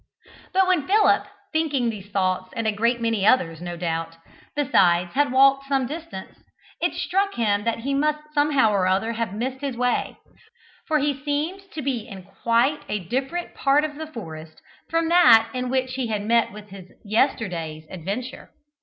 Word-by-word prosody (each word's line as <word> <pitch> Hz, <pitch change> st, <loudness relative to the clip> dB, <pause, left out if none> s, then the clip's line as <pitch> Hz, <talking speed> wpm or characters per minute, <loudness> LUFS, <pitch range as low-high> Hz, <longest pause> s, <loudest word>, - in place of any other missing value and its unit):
But 380 Hz, 0 st, +3 dB
when 360 Hz, -6 st, +1 dB
Philip, 415 Hz, +2 st, +3 dB, 0.3 s
thinking 290 Hz, -7 st, +1 dB
these 200 Hz, -2 st, -10 dB
thoughts 185 Hz, -2 st, -1 dB
and 230 Hz, -, -2 dB
a 220 Hz, -, +2 dB
great 235 Hz, +3 st, +1 dB
many 230 Hz, -3 st, 0 dB
others, 175 Hz, -8 st, +3 dB
no 175 Hz, -1 st, -5 dB
doubt, 165 Hz, -1 st, -3 dB, 0.4 s
besides, 180 Hz, -12 st, +3 dB
had 285 Hz, -1 st, +2 dB
walked 275 Hz, +1 st, +4 dB
some 270 Hz, -2 st, +1 dB
distance, 300 Hz, -, -8 dB, 0.4 s
it -, -, 0 dB
struck 395 Hz, +2 st, 0 dB
him 205 Hz, -2 st, 0 dB
that 230 Hz, 0 st, -1 dB
he 275 Hz, +3 st, -2 dB
must 300 Hz, +2 st, -1 dB
somehow 290 Hz, -6 st, +3 dB
or 195 Hz, -3 st, +1 dB
other 195 Hz, +5 st, +1 dB
have 230 Hz, -3 st, -2 dB
missed 260 Hz, +4 st, -3 dB
his 275 Hz, -4 st, -3 dB
way, 250 Hz, 0 st, 0 dB, 0.7 s
for 310 Hz, -, +2 dB
he 290 Hz, 0 st, +1 dB
seemed 320 Hz, +7 st, -3 dB
to 305 Hz, -, -5 dB
be 250 Hz, -5 st, -2 dB
in 190 Hz, -3 st, -9 dB
quite 235 Hz, +9 st, +1 dB
a -, -, 0 dB
different 270 Hz, +8 st, -2 dB
part 285 Hz, +1 st, +2 dB
of 300 Hz, -1 st, -6 dB
the 315 Hz, 0 st, -6 dB
forest 160 Hz, -, -9 dB, 0.3 s
from 330 Hz, 0 st, +1 dB
that 235 Hz, -10 st, +6 dB
in 250 Hz, -1 st, -3 dB
which 260 Hz, 0 st, -1 dB
he 255 Hz, -2 st, -2 dB
had 210 Hz, -2 st, -2 dB
met 230 Hz, 0 st, +2 dB
with 210 Hz, +1 st, -11 dB
his 190 Hz, -1 st, -11 dB, 0.2 s
yesterday's 180 Hz, -, -1 dB
adventure. 200 Hz, +9 st, -5 dB
240 Hz, 175 wpm, -23 LUFS, 200-290 Hz, 0.7 s, that